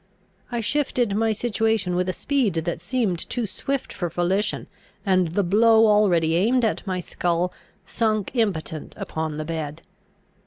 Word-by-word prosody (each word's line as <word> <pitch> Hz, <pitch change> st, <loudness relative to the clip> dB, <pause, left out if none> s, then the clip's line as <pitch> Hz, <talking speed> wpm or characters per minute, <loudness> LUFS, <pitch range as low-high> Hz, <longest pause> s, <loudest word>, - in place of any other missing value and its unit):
I 240 Hz, -1 st, -1 dB
shifted 245 Hz, -4 st, 0 dB
my 225 Hz, +1 st, +2 dB
situation 220 Hz, -4 st, 0 dB
with 180 Hz, +1 st, 0 dB
a -, -, +2 dB
speed 250 Hz, -, 0 dB
that 165 Hz, +1 st, -2 dB
seemed 190 Hz, -2 st, 0 dB
too 240 Hz, -2 st, -1 dB
swift 270 Hz, +6 st, -3 dB
for 175 Hz, -, -3 dB
volition, 180 Hz, +5 st, 0 dB, 0.4 s
and 185 Hz, -3 st, +3 dB
the 180 Hz, +5 st, 0 dB
blow 220 Hz, +4 st, +5 dB
already 190 Hz, -7 st, +3 dB
aimed 230 Hz, +8 st, +3 dB
at 220 Hz, -, -2 dB
my 185 Hz, -1 st, -1 dB
skull 175 Hz, 0 st, -1 dB, 0.3 s
sunk 215 Hz, -2 st, 0 dB
impotent 165 Hz, -9 st, -2 dB
upon 160 Hz, -1 st, -4 dB
the 155 Hz, -, -3 dB
bed. 160 Hz, -1 st, -5 dB
195 Hz, 150 wpm, -24 LUFS, 170-225 Hz, 0.4 s, blow